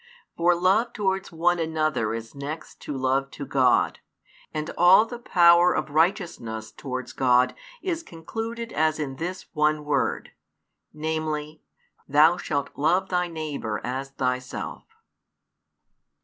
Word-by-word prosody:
For 175 +1 +3
love 195 +7 +2
towards 190 -2 -1
one 175 +1 +1
another 155 -8 0
is 115 0 -7
next 145 +3 -7
to 145 - -5
love 135 +1 0
to 140 - -5
God, 130 -2 +2 0.5
and 155 0 -3
all 180 +5 +7
the 240 +1 -8
power 175 -5 +5
of - - -2
righteousness 155 - 0
towards 130 -2 -6
God 125 -1 +3 0.3
is 345 -3 -1
concluded 225 - -6
as 155 0 +2
in 135 -4 -4
this 180 +4 -5
one 150 -1 +1
word, 150 - -1 0.6
namely, 155 -1 -3 0.5
Thou 155 +5 +5
shalt 145 -5 -2
love 175 +6 +1
thy 180 -1 +1
neighbour 150 -10 -4
as 130 +2 -3
thyself. 130 -1 -3
155 Hz, 125 wpm, -25 LUFS, 135-175 Hz, 0.6 s, all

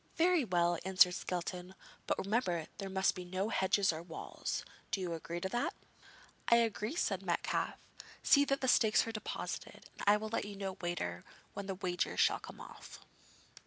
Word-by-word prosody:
'Very 345 -2 +4
well,' 175 -4 +2
answered 185 -1 +5
Skelton; 180 +1 -4 0.3
'but - - +1
remember 190 -6 0
there 195 -1 -4
must 190 0 +2
be 185 - -6
no 185 +4 -2
hedges 190 -3 +2
or 160 - -5
walls. 165 -1 -5 0.2
Do - - -1
you 180 -2 -2
agree 165 +1 -4
to 190 - -2
that?' 240 +4 -1 0.7
'I 235 - +7
agree,' 225 +2 +1
said 195 - 0
Metcalfe; 175 -3 -1 0.5
'see 285 - +6
that 275 0 0
the 260 - 0
stakes 220 -3 +5
are 225 - -3
deposited, 215 -1 -6
and - - -9
I 205 +1 +7
will 215 +1 -5
let 230 - -1
you 205 0 -7
know 195 -1 -4
later 130 - -3 0.3
where 200 - -5
the 195 -1 -3
wager 180 -2 -1
shall - - +4
come - - -11
off.' - - -11
190 Hz, 180 wpm, -34 LUFS, 175-215 Hz, 0.7 s, I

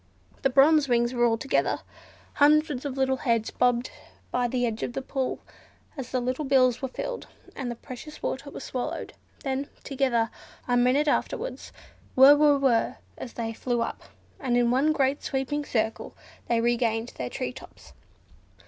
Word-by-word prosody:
The 270 - +3
Bronze 280 +2 +5
Wings 240 0 +2
were 240 -1 +3
all 230 -1 +2
together. 270 +4 0 0.5
Hundreds 295 -2 +3
of 275 -2 -4
little 265 0 +2
heads 230 -4 0
bobbed 245 0 +1 0.4
by 245 0 +1
the 245 0 0
edge 225 -2 -3
of - - -3
the 270 - -3
pool, 265 -1 -2 0.6
as 265 -4 -6
the 255 - 0
little 255 +4 -2
bills 255 -3 +3
were 265 - -1
filled, 485 - -5 0.3
and 265 -3 -4
the 240 - -4
precious 260 +6 -10
water 275 +2 -3
was 280 - -8
swallowed; 250 -1 -4 0.3
then, 275 0 -2
together, 255 -5 0 0.4
a 245 - +2
minute 255 +5 +3
afterwards, - - -2 0.5
"whrr, 270 +3 +9
whrr, 290 -1 +4
whrr," 255 -4 +2 0.2
up - - -5
they 225 -1 -3
flew, 240 0 -1 0.5
and 245 -3 +1
in 240 -1 +3
one 275 +5 +3
great 280 -2 +1
sweeping 275 +2 -2
circle 220 -5 -2 0.3
they 235 -1 +2
regained 235 -1 +1
their 125 -1 -3
tree 125 - -4
tops. - - -14
255 Hz, 165 wpm, -26 LUFS, 240-275 Hz, 0.6 s, whrr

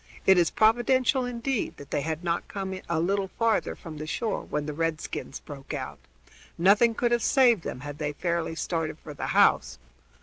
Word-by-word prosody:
"It 190 -1 +6
is 170 - +3
providential 250 +3 +3
indeed 245 0 -2
that 140 - -12
they - - 0
had 160 +2 -3
not 170 -1 -1
come 190 -1 -5
a 170 -1 +1
little 195 +3 0
further 230 -1 +1
from 160 -4 -9
the 155 - -5
shore 215 +6 -2
when 150 0 -3
the 150 - -4
redskins 155 -3 -3
broke 140 -2 -8
out. - - -6 0.6
Nothing 210 +6 +4
could 240 +1 +1
have 240 -1 +2
saved 240 -5 +4
them, 125 - -6
had 145 0 -7
they 150 -1 -2
fairly 170 0 -2
started 165 -2 -2
for 150 - -10
the 145 - -4
house." - - +3
175 Hz, 190 wpm, -27 LUFS, 155-230 Hz, 0.6 s, It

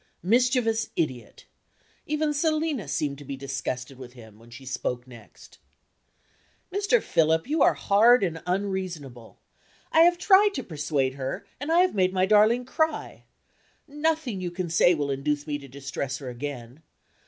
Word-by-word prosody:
Mischievous 225 +1 +2
idiot! 130 -8 -4 0.6
Even 300 0 0
Selina 305 - -1
seemed 140 0 -2
to - - -10
be 140 0 -6
disgusted 135 -1 -5
with 125 -1 -10
him, 110 -4 -15
when 115 +1 -17
she 120 +3 -12
spoke 125 -1 -3
next.) 120 -4 -16 1.1
"Mr. 405 +5 +2
Philip, 160 +2 +1
you 305 +1 0
are - - +5
hard 220 +3 +4
and 165 -3 -2
unreasonable. 180 - -4 0.5
I - - +4
have 345 +1 +6
tried 400 +2 +4
to - - -3
persuade 145 -4 -1
her, 135 -1 -5
and 290 +4 -3
I 340 +2 +5
have 370 - +2
made 185 -2 +1
my 185 0 +2
darling 215 +5 +4
cry. 315 +3 -2 0.6
Nothing 295 -7 -1
you 180 - -3
can 175 -1 -5
say 175 +1 +4
will 145 -2 -2
induce 145 +2 -2
me 145 -2 -3
to 140 - -12
distress 135 0 -5
her 135 -3 -7
again. 125 +1 -7
170 Hz, 155 wpm, -26 LUFS, -, 1.1 s, have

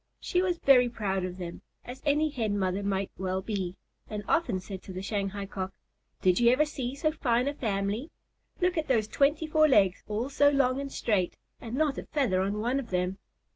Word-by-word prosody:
She 360 - 0
was 360 -2 0
very 255 -5 +5
proud 195 -5 -2
of 180 0 -4
them, 175 -2 -7 0.2
as 255 +2 -8
any 300 +2 +3
Hen 220 -6 -1
mother 190 0 0
might 195 -1 -1
well 190 0 -1
be, 190 -3 -3 0.3
and 210 -1 -4
often 285 - +1
said 190 0 -8
to 195 - -10
the 185 +1 -5
Shanghai 200 -1 -2
Cock, 190 -1 -5 0.5
"Did 185 -1 +4
you 235 -1 +6
ever 285 +5 +4
see 265 -4 -4
so 310 +2 +1
fine 250 -4 +1
a 285 - 0
family? 210 +2 -2 0.5
Look 360 -1 +2
at 310 - -3
those 225 -6 +2
twenty 290 +7 +2
four 310 0 +4
legs, 200 -9 +4
all 220 +5 -2
so 285 +1 +5
long 275 -1 +2
and 275 -1 -6
straight, 190 -6 0 0.2
and 230 0 -6
not 295 -1 +1
a - - -9
feather 235 -11 +1
on 200 +2 -1
one 245 +4 +1
of 245 -4 -7
them." 180 +1 -1
225 Hz, 210 wpm, -29 LUFS, 195-280 Hz, 0.5 s, you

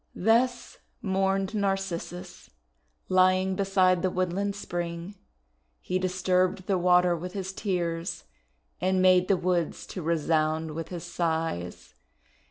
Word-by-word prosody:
'1 - - -8
Thus 240 +2 +2 0.3
mourned 195 0 0
Narcissus, 195 -3 -3 0.6
lying 185 0 +3
beside 185 -2 +3
the 185 - +1
woodland 185 +2 -1
spring. 175 -1 -5 0.7
He 185 - -2
disturbed 185 0 +1
the 190 -2 +1
water 180 0 +4
with 180 +2 -6
his 190 -1 -4
tears, 175 -4 -2 0.6
and 185 +1 +1
made 185 0 +5
the 195 - +3
woods 175 -2 -1
to 185 - -6
resound 160 -1 0
with 165 +1 -5
his 175 -2 -6
sighs. 165 - -3
185 Hz, 120 wpm, -27 LUFS, 170-190 Hz, 0.7 s, made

